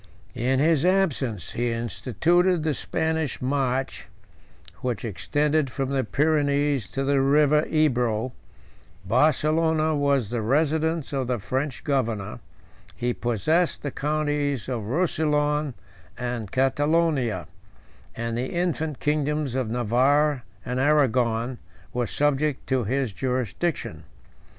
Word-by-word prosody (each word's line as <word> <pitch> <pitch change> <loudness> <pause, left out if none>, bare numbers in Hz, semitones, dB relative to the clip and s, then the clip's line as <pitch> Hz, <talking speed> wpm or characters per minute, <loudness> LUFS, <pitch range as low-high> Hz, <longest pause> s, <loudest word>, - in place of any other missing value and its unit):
In 130 +3 0
his 155 -1 +3
absence 145 - +1
he 120 +1 -1
instituted 160 - +1
the 155 -1 +1
Spanish 160 -2 -1
march, 130 0 -1 0.7
108 - - -26
which 125 -2 -2
extended 145 - 0
from 135 +1 -2
the 135 -1 0
Pyrenees 145 -1 +1
to 135 - -1
the 140 0 +2
River 150 +2 +4
Ebro: 125 -6 +1 0.7
Barcelona 155 - +2
was 140 -6 +1
the 120 -2 -1
residence 155 +5 +1
of 135 -3 -1
the 125 -1 0
French 130 +6 -3
governor: 115 -7 -1 0.6
he 120 0 -1
possessed 155 - 0
the 145 - -2
counties 145 -4 -1
of 115 -5 -3
Rousillon 150 -2 0 0.4
and 120 -4 -4
Catalonia; 145 -1 +1 0.7
and 115 0 -3
the 125 +2 -3
infant 160 -4 -1
kingdoms 150 -2 0
of 130 -4 -1
Navarre 130 +5 +2 0.2
and 125 +1 -2
Arragon 125 -4 +2 0.3
were 120 -1 -1
subject 145 +1 0
to 130 -4 +1
his 130 -1 -1
jurisdiction. 130 - -2
140 Hz, 115 wpm, -25 LUFS, 125-150 Hz, 0.7 s, River